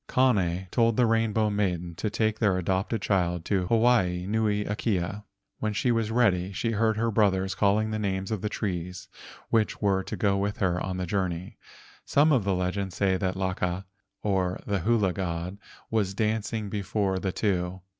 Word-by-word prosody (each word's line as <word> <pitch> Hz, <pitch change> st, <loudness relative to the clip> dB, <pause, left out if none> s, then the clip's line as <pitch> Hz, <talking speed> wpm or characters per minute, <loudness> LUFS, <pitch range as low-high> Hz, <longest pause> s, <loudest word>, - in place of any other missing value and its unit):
Kane 95 Hz, -8 st, +2 dB
told 115 Hz, -2 st, +2 dB
the 125 Hz, -, +5 dB
Rainbow 110 Hz, -1 st, +2 dB
Maiden 90 Hz, -4 st, -1 dB
to 105 Hz, -, -1 dB
take 110 Hz, 0 st, 0 dB
their 100 Hz, -5 st, +2 dB
adopted 95 Hz, +4 st, -1 dB
child 90 Hz, -4 st, 0 dB
to 95 Hz, -3 st, 0 dB
Hawaii 110 Hz, -6 st, +3 dB
nui 105 Hz, 0 st, 0 dB
akea. 105 Hz, -1 st, -2 dB, 0.3 s
When 110 Hz, -1 st, -1 dB
she 120 Hz, +4 st, +1 dB
was 115 Hz, -2 st, 0 dB
ready, 100 Hz, -6 st, +2 dB
she 115 Hz, +4 st, -1 dB
heard 110 Hz, 0 st, +1 dB
her 115 Hz, +1 st, +1 dB
brothers 95 Hz, -3 st, +2 dB
calling 105 Hz, +3 st, +2 dB
the 110 Hz, -, -2 dB
names 95 Hz, -1 st, -2 dB
of 110 Hz, -4 st, -2 dB
trees 90 Hz, -4 st, -4 dB, 0.4 s
which 110 Hz, -2 st, +1 dB
were 100 Hz, -2 st, +2 dB
to -, -, -5 dB
go 100 Hz, -3 st, +2 dB
with 100 Hz, +1 st, -1 dB
her 90 Hz, -2 st, 0 dB
on 95 Hz, -1 st, -3 dB
her 90 Hz, -, -2 dB
journey. 90 Hz, -2 st, -3 dB, 0.4 s
Some 150 Hz, +2 st, +3 dB
of 130 Hz, -7 st, +3 dB
the 100 Hz, -2 st, +1 dB
legends 90 Hz, +1 st, -2 dB
say 95 Hz, -2 st, +2 dB
that 95 Hz, -1 st, -1 dB
Laka, 95 Hz, 0 st, -2 dB, 0.4 s
the 95 Hz, 0 st, 0 dB
hula 105 Hz, -4 st, +2 dB
god, 90 Hz, +1 st, -4 dB, 0.3 s
was 100 Hz, -4 st, 0 dB
dancing 110 Hz, 0 st, -1 dB
before 100 Hz, -1 st, -1 dB
the 95 Hz, 0 st, -2 dB
two. 90 Hz, -2 st, -1 dB
100 Hz, 170 wpm, -27 LUFS, 90-110 Hz, 0.4 s, the